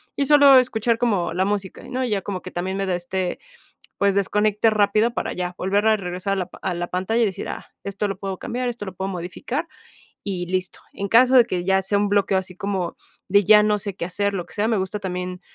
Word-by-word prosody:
y 280 - 0
solo 285 -2 +8
escuchar 230 -2 +1
como 195 -8 0
la 185 - +1
música, 200 -2 -3
¿no? 255 0 -1
Ya 205 -4 -1
como 190 -3 -5
que - - -8
también 185 +2 -3
me 195 - -1
da 180 - +1
este, 180 +1 -3 0.6
pues, 200 -1 +2
desconecte 210 +2 +2
rápido 215 +2 +2
para - - -2
ya 180 0 -3
volver 200 +3 +1
a 215 - +4
regresar 185 +1 -3
a - - -4
la 185 -2 -2
pa - - -15
a 185 - -1
la 175 0 -3
pantalla 205 +6 0
y - - +4
decir, 190 - -4
ah, - - -6 0.2
esto 200 +1 -2
lo 195 - -3
puedo 195 -1 -5
cambiar, 245 +1 -3
esto 230 -4 -5
lo 190 - -7
puedo 190 +2 -4
modificar 190 - -4 0.6
y 185 -3 -3
listo. 185 -1 -2
En 200 0 -4
caso 250 +4 +5
de 240 - +8
que 180 -5 -2
ya 190 0 +3
sea 200 +2 0
un 205 0 +1
bloqueo 200 -1 +2
así 185 -1 -6
como 190 -3 -3 0.3
de 200 +1 +4
ya 210 +2 +7
no 210 0 +2
sé 200 -2 -4
qué - - -3
hacer, 200 +3 -1
lo 180 -3 -3
que - - -16
sea, 215 +1 0
me 225 - +2
gusta 190 +2 -3
también 180 -1 -4
200 Hz, 245 wpm, -22 LUFS, 185-215 Hz, 0.6 s, solo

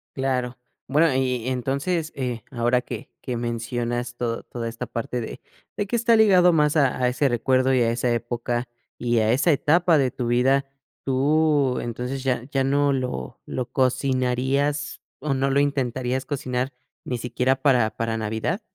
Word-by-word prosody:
Claro. 130 -2 -1 0.3
Bueno, 150 +2 +3
y 125 -3 0
y - - +1
entonces 140 +6 -1
eh, 125 -4 -3
ahora 120 -1 +1
que, - - -7
que 125 - -4
mencionas 120 +1 -3
to 115 -1 -3
toda 115 -1 -5
esta 115 - -6
parte 120 +1 -3
de 115 - -6 0.3
de 205 - -2
que 235 - 0
está 230 0 +4
ligado 185 -5 +6
más 150 0 +3
a 140 -3 +3
a 125 - +4
ese 135 +3 +1
recuerdo 130 +2 +2
y 125 - +3
a 115 0 +2
esa 120 +1 0
época 120 +1 -2 0.3
y 120 -1 0
a 110 +1 +2
esa 150 +6 +3
etapa 165 +3 +3
de 130 -3 +2
tu 120 -2 -3
vida. 130 +3 +3 0.4
¿Tú, 140 0 +2
entonces, 125 +3 -4
ya 125 -2 0
ya 135 -2 +1
no 140 +1 +2
lo 125 - -4
lo 125 -2 -4
cocinarías 130 +2 0 0.2
o 140 -1 -1
no 135 +1 +1
lo 140 +1 +2
intentarías 130 -2 -1
cocinar 130 -2 -2 0.3
ni 125 - -3
siquiera 125 +2 0
para 125 -6 +4
para 115 -1 -1
navidad? 110 - -2
130 Hz, 170 wpm, -24 LUFS, 120-140 Hz, 0.4 s, ligado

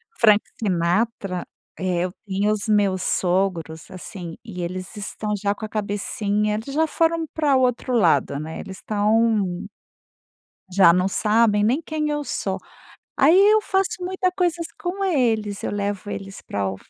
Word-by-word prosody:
Frank 215 -2 +5 0.2
Sinatra, 185 0 0 0.3
eh, 180 -2 0
eu 185 - -4 0.2
via 200 +2 +1
os 210 0 -2
meus 200 -3 +2
sogros, 175 -4 -1
assim, 180 -2 -8
e 200 -6 -7
eles 185 +3 -5
estão 210 +1 -4
já 200 0 0
com 215 - -7
a - - -8
cabecinha 210 0 -1
eles 225 +6 -5
já 320 +2 +2
foram 330 +1 +1
para 295 -3 +2
o 260 - +4
outro 250 0 0
lado, 160 - +3
né. 160 +2 -6
Eles 190 -1 -8
estão 210 -3 +1 1.1
já 185 -2 +7
não 180 +2 +2
sabem 210 +1 +3
nem 250 +9 +2
quem 305 -1 -2
eu 295 0 -1
sou. - - -2 0.6
Aí, 315 +7 +6
eu 420 +2 +6
faço 385 -1 0
muita 370 0 0
coisas 345 -2 0
com 370 +3 -3
eles. 225 - 0
Eu - - -1
levo 205 0 -3
eles 195 -1 -7
para 100 -1 -2
o 95 - -4
210 Hz, 160 wpm, -23 LUFS, 185-260 Hz, 1.1 s, já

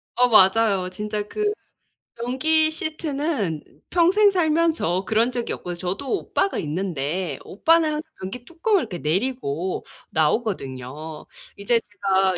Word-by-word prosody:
어 250 +1 +5
맞아요. 195 -2 +5
진짜 210 +2 -3
그 420 - 0 0.6
변기 310 +7 +2
시트는 300 - -2 0.3
평생 370 +5 +5
살면서 320 - +1
그런 225 +4 +2
적이 240 -1 -3
없거든 175 -1 -6
저도 195 +10 -3
오빠가 395 - -1
있는데 160 -1 -2
오빠는 325 - +3
항상 300 0 -2 0.2
변기 215 +6 -6
뚜껑을 355 +5 +1
이렇게 200 -7 -5
내리고 185 - -1 0.2
나오거든요. 155 - -2 0.3
이제 230 +4 +2
제가 195 -3 +1
215 Hz, 275 characters per minute, -23 LUFS, -, 0.6 s, 어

